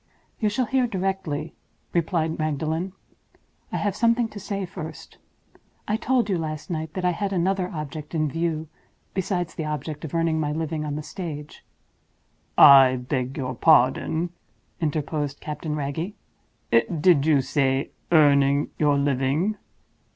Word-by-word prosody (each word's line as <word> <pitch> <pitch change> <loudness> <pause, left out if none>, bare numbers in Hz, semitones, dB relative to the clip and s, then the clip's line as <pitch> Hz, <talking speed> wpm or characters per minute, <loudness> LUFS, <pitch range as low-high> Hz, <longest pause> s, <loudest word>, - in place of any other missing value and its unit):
'" - - -40
"You 215 - +2
shall 245 +5 0
hear 255 0 +1
directly," 190 -7 -2 0.4
replied 165 -1 0
Magdalen. 160 +4 -1 0.8
"I - - -1
have 205 -2 -1
something 235 0 +2
to 210 - -9
say 195 0 -3
first. 175 -3 -9 0.7
I 210 - +1
told 245 0 +1
you, 190 -4 0
last 155 0 -5
night, 160 -1 -4
that 185 -1 -2
I 180 - +4
had 195 +3 -2
another 185 0 0
object 150 0 -6
in 155 -1 +1
view 160 +1 -2 0.5
besides 180 -3 -2
the 160 - -4
object 150 0 -4
of 160 0 -5
earning 165 -1 +1
my 150 -1 -1
living 160 -1 -2
on 145 -1 -3
the 150 - -4
stage—" 150 -5 -7 0.9
"I 135 -2 +9
beg 125 +1 -3
your 130 -2 -2
pardon," 160 +5 +3 0.5
interposed 150 -2 -2
Captain 150 0 -4
Wragge. 150 +7 -3 0.6
"Did 150 +5 +3
you 145 -4 +5
say, 135 0 0 0.2
earning 140 -2 +4
your 145 -2 +3
living?" 140 +8 +1
160 Hz, 145 wpm, -24 LUFS, 145-180 Hz, 0.9 s, I